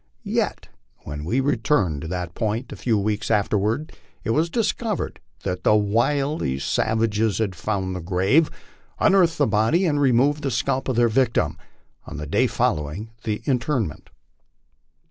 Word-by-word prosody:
Yet -, -, -1 dB, 0.4 s
when 75 Hz, +1 st, -6 dB
we 120 Hz, +10 st, +1 dB
returned 105 Hz, -, +1 dB
to 80 Hz, -, -5 dB
that 90 Hz, -1 st, -4 dB
point 110 Hz, +6 st, -2 dB
a -, -, -6 dB
few 115 Hz, -3 st, 0 dB
weeks 105 Hz, +2 st, -1 dB
after 105 Hz, -1 st, +2 dB
ward 110 Hz, +10 st, -1 dB, 0.3 s
it -, -, -1 dB
was 160 Hz, +7 st, +2 dB
discovered 225 Hz, 0 st, -1 dB, 0.2 s
that 90 Hz, -2 st, -3 dB
the 105 Hz, -, +5 dB
wily 120 Hz, -, +1 dB
savages 110 Hz, +8 st, 0 dB
had 110 Hz, -4 st, 0 dB
found 95 Hz, 0 st, -2 dB
the -, -, -3 dB
grave, 95 Hz, -, +2 dB, 0.5 s
unearthed 175 Hz, -4 st, +4 dB
the 145 Hz, -, +3 dB
body, 110 Hz, -, +2 dB
and 145 Hz, -4 st, +1 dB
removed 140 Hz, +3 st, +3 dB
the 140 Hz, -, -1 dB
scalp 130 Hz, +2 st, -1 dB
of 130 Hz, -, 0 dB
their 120 Hz, 0 st, +4 dB
victim, 120 Hz, +1 st, +1 dB, 0.5 s
on -, -, -7 dB
the 75 Hz, -, -5 dB
day 105 Hz, -, +2 dB
following 100 Hz, -3 st, -1 dB
the 105 Hz, -2 st, -2 dB
interment. 125 Hz, -, -1 dB
115 Hz, 155 wpm, -23 LUFS, 100-140 Hz, 0.5 s, the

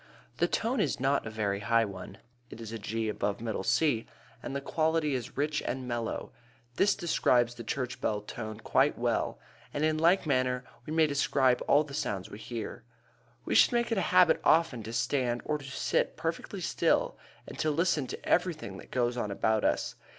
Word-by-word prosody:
The -, -, +2 dB
tone 235 Hz, +3 st, 0 dB
is -, -, 0 dB
not 135 Hz, -1 st, +1 dB
a -, -, -3 dB
very 105 Hz, -2 st, -1 dB
high 115 Hz, +2 st, +2 dB
one 95 Hz, -3 st, -8 dB, 0.3 s
(it -, -, -10 dB
is 115 Hz, -1 st, -7 dB
G 110 Hz, +2 st, -2 dB
above 105 Hz, -1 st, -2 dB
middle 110 Hz, -4 st, -3 dB
C) 130 Hz, -1 st, +2 dB, 0.3 s
and 135 Hz, -, -5 dB
the -, -, 0 dB
quality 155 Hz, +1 st, 0 dB
is 125 Hz, -2 st, -4 dB
rich 150 Hz, +1 st, 0 dB
and 130 Hz, 0 st, -4 dB
mellow. 120 Hz, -2 st, -3 dB, 0.5 s
This 200 Hz, -, +4 dB
describes 125 Hz, -9 st, +2 dB
the 120 Hz, -, -8 dB
church 125 Hz, +2 st, -3 dB
bell 105 Hz, -1 st, 0 dB
tone 110 Hz, +1 st, -7 dB
quite -, -, +2 dB
well, -, -, 0 dB, 0.3 s
and 145 Hz, -, -2 dB
in 155 Hz, 0 st, +1 dB
like 170 Hz, +3 st, +4 dB
manner 130 Hz, -3 st, +1 dB, 0.2 s
we -, -, -5 dB
may 160 Hz, 0 st, +5 dB
describe 135 Hz, -3 st, +2 dB
all 145 Hz, +2 st, +5 dB
the 145 Hz, -2 st, -11 dB
sounds 100 Hz, -9 st, -3 dB
we 105 Hz, -, -8 dB
hear. 115 Hz, -, -6 dB, 0.6 s
We -, -, -1 dB
should -, -, +6 dB
make 235 Hz, 0 st, +1 dB
it 225 Hz, -, +1 dB
a 185 Hz, -, -1 dB
habit 180 Hz, -2 st, +5 dB
often 160 Hz, -7 st, +3 dB
to 110 Hz, -, -5 dB
stand 120 Hz, -1 st, 0 dB
or 150 Hz, -1 st, -1 dB
to 140 Hz, -, -11 dB
sit 135 Hz, -, -1 dB
perfectly -, -, -4 dB
still -, -, +1 dB, 0.3 s
and -, -, -10 dB
to 155 Hz, -, +1 dB
listen 155 Hz, -3 st, +1 dB
to -, -, -7 dB
everything 160 Hz, -, 0 dB
that -, -, -12 dB
goes 120 Hz, -1 st, 0 dB
on 105 Hz, -3 st, -2 dB
about 110 Hz, +2 st, +1 dB
us. -, -, +1 dB
130 Hz, 195 wpm, -30 LUFS, 115-155 Hz, 0.6 s, should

